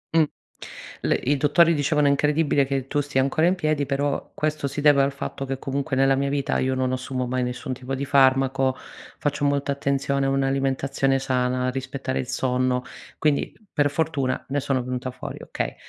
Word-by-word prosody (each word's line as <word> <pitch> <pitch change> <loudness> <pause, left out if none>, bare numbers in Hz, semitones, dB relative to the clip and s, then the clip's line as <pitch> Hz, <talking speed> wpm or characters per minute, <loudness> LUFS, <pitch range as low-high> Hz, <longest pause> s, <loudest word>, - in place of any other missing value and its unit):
Mh, 160 - +6 0.8
le - - +2
i 140 +2 0
dottori 160 +4 +4
dicevano 150 0 +2
incredibile 145 0 +2
che 135 -1 -2
tu 145 - 0
stia 140 -2 0
ancora 155 +5 +2
in 185 - +3
piedi 155 -4 0
però, 140 0 -1
questo 150 -2 -1
si 140 +2 -5
deve 145 -2 +6
al 140 +1 +2
fatto 135 0 -5
che 135 0 -3
comunque, 140 +1 -2
nella 135 +1 +4
mia 140 +1 0
vita 140 -1 0
io 130 0 0
non 130 0 0
assumo 130 0 -2
mai 130 +1 -1
nessun 125 +1 -4
tipo 130 +1 -5
di 140 +1 -3
farmaco, 135 -1 +3 0.4
faccio 145 0 -2
molta 140 0 +1
attenzione 140 0 0
a - - +1
un'alimentazione 135 0 +1
sana, 125 -1 0
rispettare 130 0 -3
il 125 - -3
sonno, 125 0 0 0.3
quindi 150 -2 +1 0.2
per 145 -1 +2
fortuna, 145 -3 -1
ne 145 +1 0
sono 135 -2 -1
venuta 125 +1 -3
fuori - - -8
okay. - - -4
135 Hz, 180 wpm, -24 LUFS, 130-145 Hz, 0.8 s, Mh